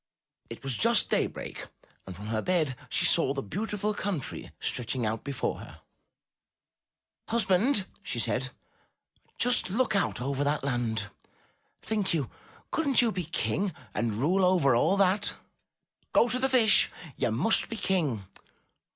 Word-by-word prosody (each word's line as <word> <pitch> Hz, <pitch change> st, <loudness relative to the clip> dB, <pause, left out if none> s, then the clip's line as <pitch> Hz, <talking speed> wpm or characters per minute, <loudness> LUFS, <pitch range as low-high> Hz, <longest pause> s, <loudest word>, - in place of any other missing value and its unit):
It -, -, -9 dB
was 135 Hz, -3 st, -1 dB
just 100 Hz, -, +2 dB
daybreak -, -, -2 dB, 0.4 s
and 95 Hz, -, -7 dB
from 100 Hz, +4 st, -10 dB
her 110 Hz, 0 st, -2 dB
bed 160 Hz, -8 st, 0 dB
she -, -, +1 dB
saw 135 Hz, -, +3 dB
the 135 Hz, -, -3 dB
beautiful 210 Hz, -, -3 dB
country 195 Hz, -7 st, -4 dB
stretching 120 Hz, 0 st, -1 dB
out 110 Hz, +1 st, -2 dB
before 140 Hz, -2 st, -3 dB
her. -, -, -12 dB, 1.5 s
''Husband, 210 Hz, +1 st, +2 dB, 0.2 s
she -, -, -4 dB
said, -, -, 0 dB, 0.9 s
"just 245 Hz, -5 st, +2 dB
look 230 Hz, +3 st, 0 dB
out 200 Hz, -, 0 dB
over 135 Hz, +2 st, -2 dB
that 145 Hz, 0 st, 0 dB
land. 115 Hz, -6 st, -2 dB, 0.7 s
Think 210 Hz, -5 st, 0 dB
you! 145 Hz, -6 st, -2 dB, 0.4 s
Couldn*t 275 Hz, -6 st, +2 dB
you 230 Hz, -, +1 dB
be 180 Hz, -4 st, -4 dB
King 175 Hz, +4 st, -1 dB, 0.2 s
and 115 Hz, -3 st, -1 dB
rule 170 Hz, -, +1 dB
over 175 Hz, -9 st, +4 dB
all 160 Hz, +11 st, +2 dB
that. 195 Hz, +1 st, +4 dB, 0.8 s
Go 235 Hz, -, +5 dB
to 250 Hz, -, +1 dB
the 265 Hz, +1 st, +1 dB
Fish. 235 Hz, -5 st, +6 dB, 0.3 s
You -, -, 0 dB
must 130 Hz, -, +3 dB
be 230 Hz, -, -5 dB
King. 155 Hz, -, -1 dB
175 Hz, 140 wpm, -28 LUFS, 125-210 Hz, 1.5 s, Fish